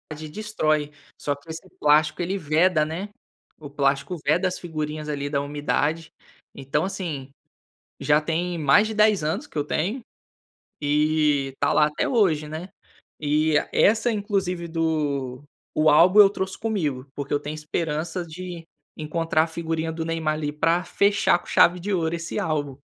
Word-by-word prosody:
De 155 +1 -8
destrói, 155 -7 -1 0.3
só 145 - -1
que 140 +3 -19
esse 165 +4 -7
plástico 155 +2 +3
ele 185 +3 -1
veda, 160 0 +2
né. 170 +7 -5 0.5
O 150 -2 -9
plástico 140 +3 0
veda 180 +3 +2
as 185 - -3
figurinhas 155 -2 -5
ali, 145 -1 -3
da 140 -1 0
umidade. 150 +2 -1 0.4
Então, 140 +4 -1
assim, 160 -9 -5 0.7
já 150 0 +3
tem 170 +3 -2
mais 160 +8 +4
de 220 - -4
10 215 -3 +4
anos 165 - -2
que - - -18
eu 145 - +2
tenho, 195 - -2 0.8
e 150 -2 +1
tá - - +2
lá, 150 - +5
até 150 - -2
hoje, 180 - +2
né, 160 +5 -7 0.5
eh, 155 +1 +2
é - - -2
essa 225 +3 +4
inclusive 195 -5 -2
do 150 -6 -2 0.3
o 155 0 +4
álbum 180 +7 +6
eu 200 - +7
trouxe 190 -1 -4
comigo, 160 - -2
porque 140 -1 -4
eu 145 - +2
tenho 145 +1 -6
esperança 160 +3 -3
de, 170 0 -8 0.3
encontrar 160 0 0
a - - -3
figurinha 160 0 -3
do 160 0 -4
Neymar 165 -1 -1
ali, 150 -1 -3
para 165 +4 +1
fechar 200 -2 +2
com - - -19
chave 180 +1 +4
de 200 +4 -3
ouro 165 -2 0
esse 170 0 -5
álbum. 145 -4 -2
160 Hz, 165 wpm, -24 LUFS, 150-180 Hz, 0.8 s, eu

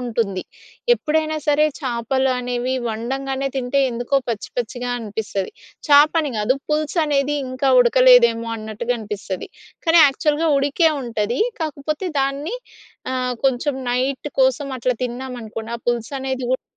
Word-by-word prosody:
ఉంటుంది. 225 -6 -2 0.5
ఎప్పుడైనా 310 -5 0
సరే 295 0 +4
చేపలు 260 0 0
అనేవి 250 +1 -2
వండంగానే 265 +4 -2
తింటే, 255 +2 0
ఎందుకో 240 +3 -1
పచ్చి 225 -3 -3
పచ్చిగా 245 +1 -3
అనిపిస్తది. 205 -3 -4 0.4
చేపని 295 +1 +5
గాదు, 210 +5 +2
పులుసనేది 300 -2 +1
ఇంకా 255 +1 0
ఉడకలేదేమో 235 -2 +5
అన్నట్టుగా 220 +3 -3
అనిపిస్తది, 205 -3 -5 0.4
కానీ 330 +1 +6
యాక్చల్‌గా 300 +3 +1
ఉడికే 285 +4 +3
ఉంటది. 230 -1 -2 0.2
కాకపోతే, 305 +3 -3
దాన్ని 280 - -2 0.6
ఆహ్, 255 -1 -1
కొంచెం 265 +2 +1 0.2
నైట్ 260 +3 -1
కోసం 265 +2 +2
అట్లా 250 +1 0
తిన్నామనుకోండి, 240 -3 -6
ఆ 235 - -17
పులుసనేది 260 +2 -2
గూడా 260 - -1
255 Hz, 120 wpm, -21 LUFS, 235-280 Hz, 0.6 s, కానీ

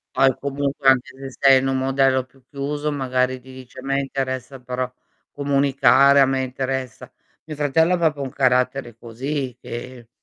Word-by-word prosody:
Poi 135 -1 +4
comunque, 140 0 -1
anche 130 0 +3
se 135 -1 -9
sei 135 -1 +6
in 135 - -1
un 135 0 0
modello 135 0 +2
più 130 +1 -26
chiuso, 145 +2 -3
magari 130 -2 -1
ti 130 +1 -14
dice: 130 0 -13
"A - - -8
me 135 0 0
interessa 135 -1 -4
però 125 0 -4 0.4
comunicare, 140 -1 +3
a 135 - +6
me 135 0 0
interessa" 130 -1 -4 0.4
mio 155 - -6
fratello 155 +4 +2
ha - - +2
proprio 155 -4 0
un 135 - -4
carattere 125 -2 0
così, 125 +3 -5
che 120 0 -8
135 Hz, 170 wpm, -22 LUFS, 130-140 Hz, 0.4 s, sei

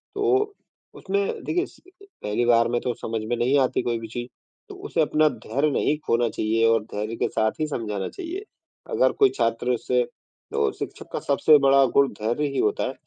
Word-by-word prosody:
तो 415 0 +1 0.4
उसमें 200 0 -2
देखिए 360 +3 0
स - - -18 0.4
पहली 105 +3 0
बार 115 -1 +4
में 120 0 0
तो 125 - -1
समझ 110 -1 -4
में 120 - +1
नहीं 130 +4 +2
आती 130 - +1
कोई 120 -1 -1
भी 115 - -7
चीज़, 120 +2 -5 0.4
तो 400 - -9
उसे 385 - -2
अपना 155 0 +3
धैर्य 140 +6 -1
नहीं 150 +2 +1
खोना 120 0 +2
चाहिए 110 +2 +1
और 115 -2 +3
धैर्य 105 +2 -3
के - - 0
साथ 110 -1 +1
ही 155 - 0
समझाना 105 -8 -3
चाहिए। 375 +3 -6 0.5
अगर - - +3
कोई 405 -1 +6
छात्र 115 +2 0
उससे 125 +1 +1 0.5
तो - - +1
शिक्षक - - -7
का - - -1
सबसे 145 +2 +4
बड़ा 135 0 +5
गुण 140 0 +6
धैर्य 120 +7 0
ही - - -1
होता 420 - +1
है, - - -4
125 Hz, 200 wpm, -24 LUFS, 115-155 Hz, 0.5 s, कोई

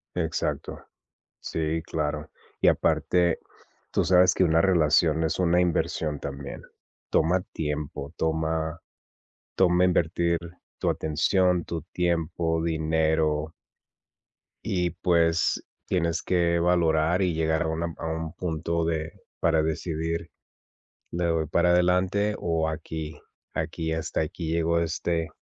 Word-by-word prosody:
Exacto. 80 -2 -2 0.6
Sí, 80 0 -2
claro, 75 -1 -3 0.3
y - - +5
aparte, 85 -2 +2 0.5
tú - - +2
sabes 90 0 +5
que 95 - +3
una 80 -1 +3
relación 80 -3 +3
es 80 - -1
una 90 -1 +3
inversión 80 -3 0
también, 70 0 -6 0.5
toma 85 +4 +3
tiempo, 75 -1 -4
toma 80 0 -1 0.8
toma 90 -1 +4
invertir 85 -1 +2 0.4
tu - - 0
atención, 90 +3 +1
tu 85 -1 -4
tiempo, 85 -1 0
dinero. 80 -1 +1 1.1
Y 90 -2 0
pues, 85 -1 +2 0.2
tienes 85 -2 0
que 85 -2 +2
valorar 85 0 +2
y 90 -2 +2
llegar 80 0 +1
a 80 - -1
una 80 +1 -2
a - - -4
un 80 0 -3
punto 85 -1 -2
de 80 0 -2 0.3
para 80 -2 +3
decidir, 80 +1 -2 0.8
le 85 +1 -2
doy 80 -2 +1
para 85 +3 +2
adelante 90 +4 +2
o 80 -2 0
aquí 80 -1 -5 0.4
aquí 80 0 -2
hasta 80 0 -2
aquí 80 +1 -3
llegó 85 0 +2
este 80 0 -1
80 Hz, 120 wpm, -26 LUFS, 80-85 Hz, 1.1 s, y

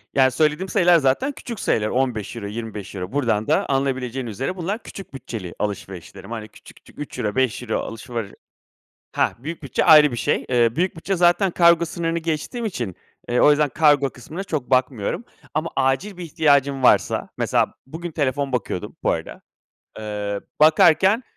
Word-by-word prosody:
Yani, 130 -1 +5
söylediğim 155 +6 +1
sayılar 175 -1 +5
zaten 150 - +1
küçük 235 -5 -8
sayılar; 105 -1 +1
€15, 115 -4 -2
€25. 105 -4 -6
Buradan 115 -6 0
da, - - +2
anlayabileceğiniz 130 -3 -1
üzere; 135 - -3
bunlar, 195 +6 -3
küçük 195 - -10
bütçeli 115 -9 -7
alışverişlerim. 100 0 -6
Hani, 110 -2 -5
küçük 110 - -17
küçük, - - -19
€3, 125 -7 -4
€5 125 -3 0
alışveri 115 -2 -6 0.8
hah, - - +1
büyük 155 +5 -7
bütçe 140 - 0
ayrı 150 -2 +8
bir 120 - -4
şey. - - 0
Eee, 120 -2 +2
büyük 180 +2 0
bütçe 190 +4 -2
zaten 175 +2 +3
kargo 170 -1 +5
sınırını 170 0 -2
geçtiğim 165 - -3
için, 120 - -4 0.3
eee, 120 - +1
o - - +6
yüzden 150 0 +3
kargo 145 -1 +3
kısmına 160 +11 -8
çok 150 -9 -4
bakmıyorum. 130 - 0 0.3
Ama 155 +2 -1
acil 135 +9 0
bir 180 - -6
ihtiyacın 140 -4 +2
varsa, - - +3
mesela; - - +1
bugün 165 +5 -7
telefon 140 -2 -1
bakıyordum, 115 -7 -3
bu - - +3
arada. - - -5 0.6
Eee, 105 -1 -4 0.2
bakarken, 175 +8 +5
135 Hz, 155 wpm, -22 LUFS, 115-165 Hz, 0.8 s, ayrı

